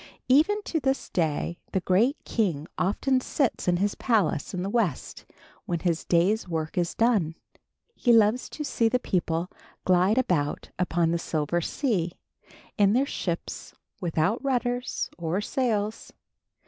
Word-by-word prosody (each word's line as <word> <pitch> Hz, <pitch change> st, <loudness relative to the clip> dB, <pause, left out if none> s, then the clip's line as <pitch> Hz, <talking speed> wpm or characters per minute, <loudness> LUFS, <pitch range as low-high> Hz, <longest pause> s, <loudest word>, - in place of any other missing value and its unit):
Even 335 Hz, +11 st, +4 dB
to 325 Hz, -, -1 dB
this 270 Hz, -1 st, -1 dB
day, 170 Hz, +1 st, -1 dB
the 190 Hz, -, +2 dB
great 210 Hz, -, +2 dB
king 170 Hz, -9 st, -1 dB
often 255 Hz, +7 st, +1 dB
sits 260 Hz, -5 st, -1 dB
in 175 Hz, 0 st, +3 dB
his 200 Hz, +2 st, +1 dB
palace 205 Hz, -, 0 dB
in 180 Hz, -1 st, -3 dB
the -, -, -2 dB
West 205 Hz, -, -1 dB, 0.4 s
when 170 Hz, -2 st, -1 dB
his 170 Hz, -3 st, 0 dB
day's 185 Hz, +5 st, +2 dB
work 160 Hz, -2 st, -3 dB
is 175 Hz, -1 st, 0 dB
done. 210 Hz, -9 st, +2 dB, 0.6 s
He 245 Hz, -, +2 dB
loves 225 Hz, +2 st, +4 dB
to 300 Hz, -, -5 dB
see 230 Hz, -5 st, +1 dB
the 250 Hz, -, +2 dB
people 175 Hz, -6 st, -1 dB, 0.3 s
glide 185 Hz, +4 st, +3 dB
about 170 Hz, -, 0 dB
upon 170 Hz, -2 st, +1 dB
the 170 Hz, -, 0 dB
silver 160 Hz, +1 st, -1 dB
sea, 180 Hz, -, -1 dB, 0.7 s
in 200 Hz, 0 st, +5 dB
their 260 Hz, +4 st, +3 dB
ships 175 Hz, -10 st, -4 dB, 0.3 s
without 170 Hz, -, 0 dB
rudders 245 Hz, -2 st, -1 dB
or 170 Hz, +3 st, -1 dB
sails. 215 Hz, -2 st, -1 dB
195 Hz, 145 wpm, -26 LUFS, 170-245 Hz, 0.7 s, in